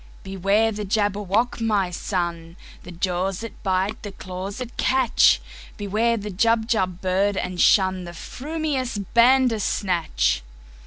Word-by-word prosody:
"Beware 195 +4 +1
the 210 0 -4
Jabberwock, 205 +3 0
my 205 -5 +1
son! 170 -2 -3 0.2
The 180 - -11
jaws 180 +2 -2
that 230 - -9
bite, 190 +1 -1
the 205 - -7
claws 190 +1 -7
that 250 -2 -7
catch! 260 -3 +3 0.4
Beware 220 +3 0
the 210 -1 -5
Jubjub 220 -3 +1
bird, 195 +2 +1
and 180 -1 -3
shunThe 185 -3 +3
frumious 280 - -3 0.2
Bandersnatch!" 210 - +2
200 Hz, 115 wpm, -23 LUFS, 185-225 Hz, 0.4 s, catch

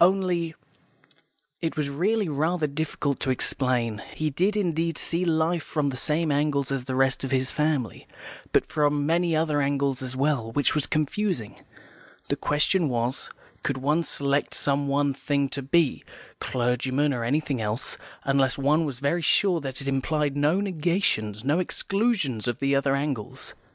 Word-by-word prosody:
Only 175 -3 +2 0.5
" - - -36
It 160 - -6
was 145 -2 -1
really 200 +8 +1
rather 160 +3 0
difficult 145 -1 -2
to 135 - -2
explain. 125 -4 0
He 155 -1 -1
did 190 +9 +1
indeed 165 -4 0
see 170 +2 0
life 165 +1 +1
from 150 -3 -1
the 130 - -4
same 155 +4 0
angle 140 -1 +1
as 135 -2 -2
the 130 -1 -3
rest 135 0 +2
of 135 - -2
his 130 0 +1
family, 150 -7 -1 0.4
but - - +3
from 145 -1 +1
many 170 +1 +2
other 155 -2 +1
angles 140 -1 0
as 130 0 -5
well, 135 -4 0
which 145 - +2
was 150 - +1
confusing. 155 - -1 0.7
The - - +2
question 150 +3 +1
was, 120 +1 -2 0.3
could - - -1
one 150 +5 +1
select 140 -2 -1
some 140 0 0
one 140 0 +1
thing 140 0 0
to 140 - -4
be, 150 +2 +2 0.4
clergyman 130 +4 0
or 120 -2 -2
anything 140 0 0
else, 110 +4 -3 0.2
unless 135 -2 +2
one 150 +4 +2
was 135 -5 -5
very 155 +5 +1
sure 175 +1 +3
that 135 -1 -4
it 140 - -6
implied 140 +1 0
no 150 +6 +2
negations, 165 - 0
no 150 +5 +2
exclusions 185 - 0
of 120 -1 -1
the 140 0 +1
other 140 0 +2
angles? 140 -6 -4
145 Hz, 165 wpm, -26 LUFS, 135-160 Hz, 0.7 s, but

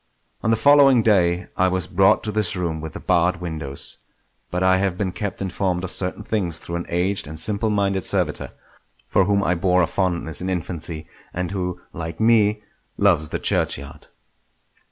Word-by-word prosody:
On - - -1
the 115 - +3
following 140 -2 +6
day 90 -5 +2
I 95 - +3
was 95 0 0
brought 95 +2 +3
to 110 - -3
this 105 0 +1
room 85 -3 -2
with 80 0 -7
the - - -7
barred 85 +1 +1
windows, 80 -6 -4 0.5
but 90 +1 -1
I 95 0 +4
have 95 -2 -1
been 95 -2 -1
kept 100 +1 -4
informed 95 -1 -2
of 95 - -4
certain 95 +3 -3
things 95 -7 -2
through 85 +1 -5
an 85 - -6
aged 90 0 0
and 80 +1 -6
simple 105 +5 +1
minded 100 -2 0
servitor, - - 0 0.6
for 95 - +3
whom 100 0 +2
I 90 - +2
bore 90 +1 +2
a - - +4
fondness 85 -3 -1
in 95 - -3
infancy, 85 -3 -2 0.3
and 90 -1 -2
who 90 -2 -3
like 80 0 -6
me 105 -2 +3 0.3
loves 85 -7 +3
the - - -2
churchyard. - - -1
90 Hz, 180 wpm, -22 LUFS, 85-100 Hz, 0.6 s, following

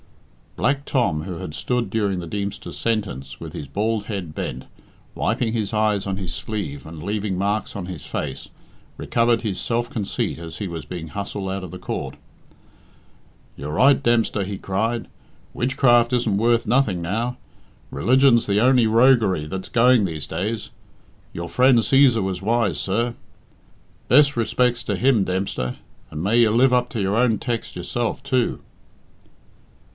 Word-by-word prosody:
Black 140 +2 0
Tom, 100 - 0
who 90 0 -5
had 75 - -6
stood 125 +1 -1
during 100 -4 0
the 85 - -6
Deemster's 100 +2 -5
sentence 100 - -2
with - - -8
his 70 - -6
bald 105 +7 -1
head 95 -7 -4
bent, 65 - -4 0.5
wiping 115 -2 0
his 110 -2 -2
eyes 105 -2 +1
on 95 -1 -2
his 95 -3 -4
sleeve 85 -11 -5
and 80 0 -9
leaving 100 -1 -2
marks 100 +3 -1
on 100 -3 -4
his 90 -6 -7
face, 70 -3 -5 0.5
recovered 115 0 +1
his 100 -5 -2
self 120 0 -1
conceit 110 - -3
as 85 0 -8
he 100 - -4
was 85 -3 -6
being 80 0 -7
hustled 100 +1 -4
out 95 0 -3
of 90 - -8
court. - - -4 1.4
"You're 75 +1 -6
right, 135 - +5
Dempster," 115 -4 +2
he 100 +1 -5
cried. 110 +6 -2 0.5
"Witchcraft 120 -1 +3
isn't 115 -5 +1
worth 115 +2 +2
nothing 115 -9 +2
now. 115 +8 -2 0.5
Religion's 130 -1 +3
the 100 0 +2
only 125 0 +4
roguery 110 - +4
that's 95 +4 -6
going 120 -2 +4
these 80 -4 -4
days. 105 +7 -3 0.6
Your 85 0 -5
friend 125 +6 +4
Cæsar 125 -2 +4
was 95 -1 -3
wise, 110 -5 +1
sir. 115 +5 -1 1.0
Bes' 145 +3 +6
re 115 -1 +1
spec's 120 -1 +1
to - - -1
him, 125 -5 +3
Dempster, 90 -10 -2 0.3
and 75 - -6
may 105 +5 +2
you 115 -2 +5
live 125 +4 +4
up 125 0 +2
to 115 - -3
your 95 +1 0
own 115 -2 +3
tex' 120 +1 -4
yourself, 115 +8 -2
too." 130 -3 0
110 Hz, 160 wpm, -22 LUFS, 95-120 Hz, 1.4 s, Bes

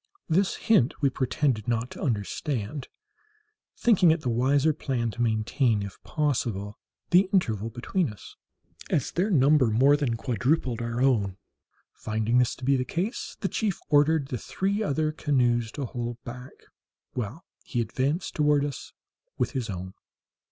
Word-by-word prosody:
This 185 +4 +2
hint 205 - +2
we 140 - +4
pretended 130 -3 0
not 120 +1 -1
to - - -9
understand, 120 +2 -2 0.9
thinking 200 -7 +4
it 160 0 +3
the 130 - -2
wiser 140 +6 +3
plan 120 -6 -2
to 120 - -5
maintain, 110 0 +1
if 100 -2 -9
possible, 115 - -2 0.3
the 185 +2 +5
interval 115 - +1
between 130 - -1
us, 100 -4 -13 0.5
as 135 - 0
their 185 +5 0
number 145 - +4
more 130 +6 +5
than 135 -6 -1
quadrupled 125 +1 0
our 120 +2 -1
own. 100 -8 +2 0.6
Finding 110 +2 0
this 125 -1 +2
to 130 - -8
be 140 +1 +4
the 130 - +1
case, 180 - -3
the - - +1
chief 210 -5 -1
ordered 145 -1 +3
the 125 -5 -3
three 200 - -1
other 155 -5 0
canoes 120 -7 +1
to 145 - -3
hold 120 -1 -4
back, 125 +2 -8 0.6
while 125 - -5 0.2
he 120 - -3
advanced 130 - -1
toward 150 -1 +3
us 145 - -7 0.4
with - - 0
his 130 -5 -3
own. 95 -1 -5
130 Hz, 150 wpm, -27 LUFS, 115-150 Hz, 0.9 s, the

